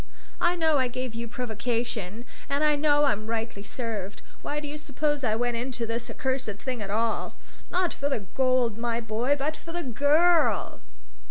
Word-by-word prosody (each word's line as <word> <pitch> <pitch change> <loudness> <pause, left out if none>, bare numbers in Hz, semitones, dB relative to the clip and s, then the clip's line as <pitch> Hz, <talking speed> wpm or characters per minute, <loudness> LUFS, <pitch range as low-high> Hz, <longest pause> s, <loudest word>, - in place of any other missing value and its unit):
I 350 0 +3
know 320 -4 +3
I 260 - +3
gave 255 -1 -4
you 230 +1 -4
provocation. 230 -2 -3 0.2
And 280 +2 +1
I 300 -1 +5
know 290 0 +4
I'm 215 -6 +1
rightly 225 -2 -2
served. 210 -2 -4 0.2
Why 295 - -2
do 295 - -5
you 300 +1 -5
suppose 295 0 -1
I 220 -3 +2
went 240 +1 0
into 240 -1 -2
this 230 +1 -3
accursed 260 -4 -1
thing 250 +1 -4
at 200 - -4
all? 225 +2 0 0.3
Not 360 -1 +1
for 280 - -1
the 270 - 0
gold, 255 -4 +2
my 235 0 0
boy, 235 +5 +1
but 300 +3 -1
for 330 - -8
the 345 +1 -2
girl! 290 +1 +3
250 Hz, 180 wpm, -27 LUFS, 230-290 Hz, 0.3 s, I